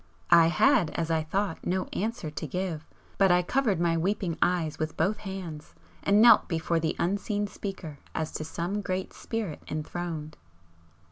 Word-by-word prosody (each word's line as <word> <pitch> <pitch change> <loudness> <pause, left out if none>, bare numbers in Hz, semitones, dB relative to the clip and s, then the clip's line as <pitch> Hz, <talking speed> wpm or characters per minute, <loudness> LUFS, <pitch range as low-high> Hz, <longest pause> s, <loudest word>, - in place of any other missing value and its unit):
I 170 -1 +8
had, 215 - +4
as 165 -1 -1
I 160 -1 +2
thought, 190 +3 -2
no 185 +1 0
answer 215 -7 -3
to 155 +1 -5
give, 170 0 -3 0.3
but 195 -2 +5
I 180 0 +4
covered 220 -3 +1
my 170 -1 +2
weeping 185 0 -1
eyes 170 -4 +1
with 155 -1 -3
both 205 +2 +1
hands 185 -7 -7 0.3
and 200 +1 +4
knelt 230 -1 +7
before 165 0 0
the 160 -1 -1
unseen 205 +3 0
speaker 190 -7 -7 0.2
as 160 -1 -2
to - - -4
some 175 +6 -3
great 185 -1 -3
Spirit 220 -9 -4
enthroned. 155 0 -5
175 Hz, 160 wpm, -28 LUFS, 160-200 Hz, 0.3 s, I